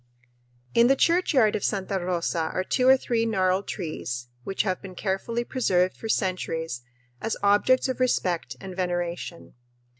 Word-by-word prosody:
In 235 +1 +6
the 270 - +5
churchyard 285 - +3
of - - -3
Santa 195 -1 -1
Rosa 170 -2 -1
are 185 - -1
two 255 +6 +1
or 265 0 +8
three 235 -3 0
gnarled 190 -3 +1
trees 125 - -4
which 195 - -1
have 185 -3 -1
been 190 -2 -9
carefully 215 +5 -2
preserved 185 -8 +1
for 225 - -7
centuries 165 - -1 0.4
as 225 - -2
objects 205 +7 +4
of 260 -1 -3
respect 175 - 0
and 190 -1 -8
veneration. 175 -1 -3
190 Hz, 150 wpm, -26 LUFS, 180-230 Hz, 0.4 s, or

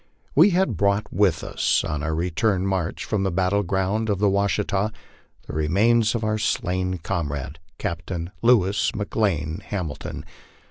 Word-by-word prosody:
We 165 +9 +7
had 180 - +1
brought 100 +3 +1
with 90 -5 +2
us - - +1
on 75 -1 -3
our 80 +1 -1
return 90 +4 0
march 95 -4 -2
from 105 -3 -1
the 95 - +1
battle 95 +3 +1
ground 100 +4 -1
of 100 - +1
the 100 +1 +2
^Vashita 100 +1 0 0.5
the - - -8
remains 105 +10 +2
of 115 - -2
our 110 0 0
slain 90 -3 -1
comrade, 75 -4 -4 0.2
Captain 85 +1 -4
Louis 105 -4 +3
McLane 100 -6 -1
Hamil 90 -10 -4
ton. - - -7
95 Hz, 150 wpm, -24 LUFS, 85-105 Hz, 0.5 s, We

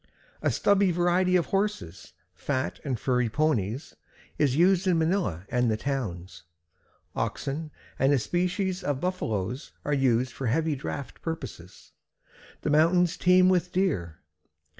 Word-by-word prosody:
A - - +2
stubby 200 -1 +3
variety 175 +1 +2
of 175 -3 +3
horses, 195 - -3 0.2
fat 130 -1 -3
and 130 -6 -2
furry 125 -3 +1
ponies, 130 - -1 0.4
is 140 -4 +2
used 185 +3 +3
in 180 -2 +3
Manila 160 - 0
and 120 -3 +1
towns. 110 -11 -4 0.7
Oxen 150 +3 -3 0.3
and 135 +1 +4
a 145 - +4
species 180 - -1
of 145 -6 -1
Buffaloes 125 - -3
are 145 - 0
used 130 -2 +2
for 135 - -4
heavy 155 +6 +1
draft 140 0 -6
purposes. 130 - -7 0.7
The 150 - -1
mountains 170 +3 +4
teem 180 0 +5
with 180 -1 +2
deer. 95 - -1
150 Hz, 130 wpm, -27 LUFS, 125-180 Hz, 0.7 s, teem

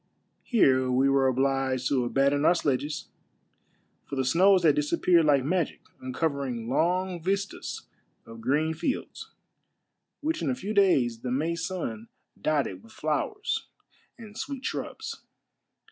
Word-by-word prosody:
Here 130 - +3
we 130 +2 +3
were 135 -1 +3
obliged 130 0 +1
to 125 -3 +1
aban 135 +2 +3
don 145 0 0
our 175 - +5
sledges, 145 -1 -2 1.0
for - - -5
the 130 -1 0
snows 185 +7 +4
had 155 -3 +6
disappeared 165 +3 +3
like 140 -3 +4
magic, 175 +1 -1 0.2
uncovering 130 -3 -2
long 175 +6 0
vistas 195 +3 -3 0.4
of 115 0 -11
green 150 +6 +1
fields, 255 - -4 0.9
which 315 +1 -1
in - - 0
a 255 - 0
few 210 -3 -4
days 135 - +3
the 125 - -5
May 150 +7 0
sun 160 - -4 0.3
dotted 140 -12 0
with 115 - -17
flowers 155 - -2 0.5
and 215 -3 -12
sweet 275 +3 -5
shrubs. 440 0 -5
150 Hz, 135 wpm, -27 LUFS, 130-185 Hz, 1.0 s, had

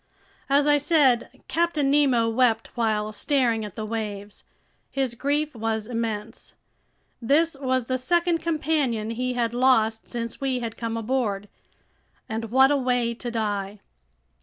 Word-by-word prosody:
As 285 +1 +3
I 295 0 +5
said, 285 -5 +2
Captain 320 -5 +1
Nemo 265 -6 +3
wept 225 -1 +1
while 215 -3 0
staring 235 -1 +1
at 210 -3 -8
the 220 - -4
waves. 210 -2 -5 0.5
His 265 -3 -1
grief 290 +5 -1
was 220 -2 -2
immense. 225 -2 -5 0.7
This 300 +7 +2
was 260 -2 0
the 255 +1 -1
second 345 +5 +1
companion 305 -9 -1
he 250 +2 -2
had 235 -1 -1
lost 225 -3 +2
since 230 0 -5
we 265 -2 0
had 230 -2 -5
come 230 -1 -3
aboard. 220 -4 -1 0.8
And 225 -1 -3
what 265 +5 +4
a 290 - +3
way 245 -3 0
to 240 +1 -6
die! 205 -3 -2
240 Hz, 140 wpm, -25 LUFS, 225-275 Hz, 0.8 s, I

